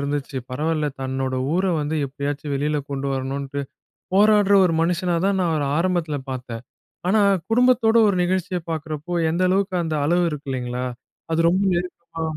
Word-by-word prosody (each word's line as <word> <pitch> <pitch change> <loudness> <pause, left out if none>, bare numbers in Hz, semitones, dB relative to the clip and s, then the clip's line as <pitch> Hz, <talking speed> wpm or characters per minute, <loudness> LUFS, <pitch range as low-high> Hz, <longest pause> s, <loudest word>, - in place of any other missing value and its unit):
இருந்துச்சு. 140 -1 -3
பரவால்ல, 155 +3 -1
தன்னோட 130 0 -2 0.2
ஊர 185 +2 +1 0.2
வந்து 150 +2 -2
எப்படியாச்சும் 145 +1 -4
வெளில 150 +1 0
கொண்டு 140 0 -3
வரணும்ன்ட்டு 135 +1 -3 0.5
போராடுற 205 0 +5
ஒரு 165 - +1
மனுஷனாதான், 180 +2 +1
நான் 175 -2 +1
அவர 145 -2 0
ஆரம்பத்தில 170 -5 0
பார்த்தேன். 125 -3 -6 0.5
ஆனா 210 +3 +4 0.3
குடும்பத்தோட 235 -1 +4
ஒரு 200 - +1
நிகழ்ச்சியை 185 0 -1
பார்க்கிறப்போ, 155 +1 -4 0.2
எந்த 170 +3 0
அளவுக்கு 190 0 +1
அந்த 160 -1 -2
அளவு 175 +2 +3
இருக்கு. 145 -2 -7
இல்லங்களா! 125 -1 -3 0.5
அது 165 - +2
ரொம்ப 185 +3 +1
நெருக்க 180 +1 -2 0.3
ஆ. - - -1
160 Hz, 150 wpm, -22 LUFS, 140-185 Hz, 0.5 s, போராடுற